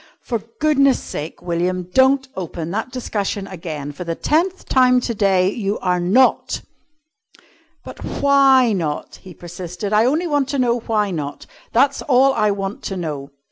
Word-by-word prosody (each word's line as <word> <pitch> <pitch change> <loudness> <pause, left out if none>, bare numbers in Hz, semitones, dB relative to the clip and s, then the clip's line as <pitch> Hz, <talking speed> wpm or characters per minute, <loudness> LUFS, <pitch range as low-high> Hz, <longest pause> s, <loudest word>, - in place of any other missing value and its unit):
"For 235 -3 -2 0.2
goodness' 275 -3 +3
sake, 150 +2 -7
William, 180 +1 -1
don't 265 +1 +4
open 170 -2 -5
that 220 +6 -3
discussion 205 -5 -3
again. 160 -6 -6
For 145 +5 -7
the 170 -1 -3
tenth 350 - 0
time 255 -1 +4
to 240 -1 -3
day, 195 -3 +2
you 205 -2 -2
are 180 -1 0
not!" 205 +10 +2 1.2
"But - - -10
why 270 -4 +4
not?" 160 -6 -3
he 185 -3 -13
persisted. 175 +3 -6
"I 215 +2 +4
only 305 +7 +1
want 290 -4 0
to 280 - -1
know 245 -2 +1
why 215 -3 -1
not. 145 -4 -5 0.3
That's 275 +3 +2
all 270 0 +4
I 215 -3 +2
want 195 0 -3
to 195 - -3
know. 150 -5 -5
210 Hz, 160 wpm, -20 LUFS, 180-260 Hz, 1.2 s, don't